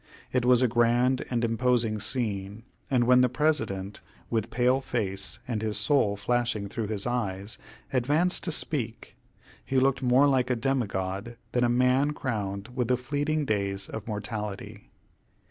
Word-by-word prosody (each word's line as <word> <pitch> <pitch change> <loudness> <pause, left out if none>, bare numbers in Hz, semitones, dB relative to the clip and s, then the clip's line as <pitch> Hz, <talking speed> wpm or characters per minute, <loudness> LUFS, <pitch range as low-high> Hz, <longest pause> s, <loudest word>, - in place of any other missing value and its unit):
It 125 -1 +1
was 125 0 +5
a - - +5
grand 120 +2 +2
and 120 -1 0
imposing 115 -2 +1
scene, 105 -3 -2 0.3
and 125 -3 +3
when 125 +1 +5
the 125 - +4
President, 115 -9 -1 0.3
with 115 -1 0
pale 125 +3 +2
face 100 -6 -1
and 115 -4 -2
his 110 -2 -1
soul 105 -2 +2
flashing 120 -1 -1
through 110 +2 -4
his 105 -2 -2
eyes, 105 -4 -2 0.3
advanced 150 +8 +2
to 170 - -1
speak, 120 -7 -2 0.5
he 135 - -1
looked 130 0 +2
more 130 +3 +4
like 130 -3 +2
a 125 - +2
demigod 115 -4 -2
than 125 - +1
a 120 - +3
man 130 +4 +3
crowned 100 -5 -3
with 125 -2 -1
the 125 +1 +2
fleeting 145 +4 -1
days 100 -3 -1
of 110 -1 -7
mortality. 105 -1 -5
120 Hz, 155 wpm, -27 LUFS, 105-130 Hz, 0.5 s, was